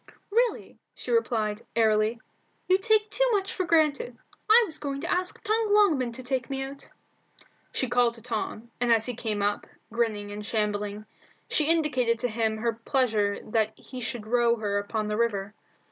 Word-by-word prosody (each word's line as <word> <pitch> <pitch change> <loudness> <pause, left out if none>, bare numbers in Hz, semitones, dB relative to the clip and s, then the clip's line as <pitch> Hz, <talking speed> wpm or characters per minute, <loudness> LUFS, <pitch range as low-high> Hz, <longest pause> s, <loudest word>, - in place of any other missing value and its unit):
"Really," 475 +3 0 0.2
she - - -6
replied, 220 - +1
airily, 220 0 +3 0.5
"you 370 +1 +4
take 425 0 +2
too - - +2
much 390 -2 0
for 370 - -1
granted. 305 -7 +2 0.3
I 465 +2 +8
was 315 -5 -6
going 275 -1 -3
to 335 - -3
ask 365 0 -1
Tom 440 +1 +1
Longman 335 - +4
to 255 +2 -7
take 255 0 -1
me 270 -1 -2
out." 275 +1 -8 0.8
She 260 - -1
called 245 -1 +2
to 230 - -13
Tom, 230 0 -4
and 245 -1 +2
as 225 -1 +4
he 250 - -2
came 215 -3 -2
up, 205 0 -1 0.3
grinning 215 -3 -1
and 210 +1 -6
shambling, 210 -1 -2 0.4
she 305 - +1
indicated 285 -8 +2
to 245 +2 -1
him 220 -1 0
her 230 +1 0
pleasure 225 -4 +1
that 220 -1 +1
he 255 -1 -9
should 225 -1 -4
row 235 +1 +3
her 205 -3 -1
upon 210 +1 -2
the 210 0 -1
river. 210 -3 0
235 Hz, 175 wpm, -27 LUFS, 215-300 Hz, 0.8 s, I